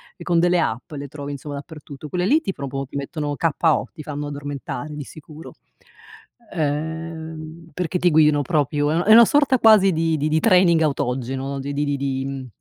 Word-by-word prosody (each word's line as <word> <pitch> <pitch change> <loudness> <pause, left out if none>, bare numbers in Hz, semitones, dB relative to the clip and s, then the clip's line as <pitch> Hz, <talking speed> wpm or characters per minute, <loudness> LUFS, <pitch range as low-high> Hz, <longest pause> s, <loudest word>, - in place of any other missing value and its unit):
e 170 - -11
con 170 -1 +2
delle 175 +1 +3
app 110 -5 -3
le 145 -1 -6
trovi, 145 0 -7
insomma, 145 +1 -7
dappertutto. 145 0 -10
Quelle 180 +4 -2
lì, 295 +10 +4
ti 195 -12 -4
proprio 135 0 -5
ti - - -12
mettono 145 +1 -3
k.o. 160 0 +1
ti 155 -3 -9
fanno 145 0 -5
addormentare, 145 0 -6
di 150 - -5
sicuro. 155 +2 -12 1.0
Uhm, 160 +1 -4
perché 180 +1 -2
ti 175 - +3
guidano 150 -2 +4
proprio, 145 -1 0
è - - +1
una 170 - +1
è 215 - +4
una 235 +1 +9
sorta 275 0 +3
quasi, 215 -4 +6
di 165 -1 0
di 150 +2 -1
di 155 +1 +2
training 180 -4 +4
autogeno. 135 -1 -2
Di 140 +1 -5
di 145 +1 -1
di 145 -1 -1
di 135 -1 -3
150 Hz, 190 wpm, -22 LUFS, 140-165 Hz, 1.0 s, una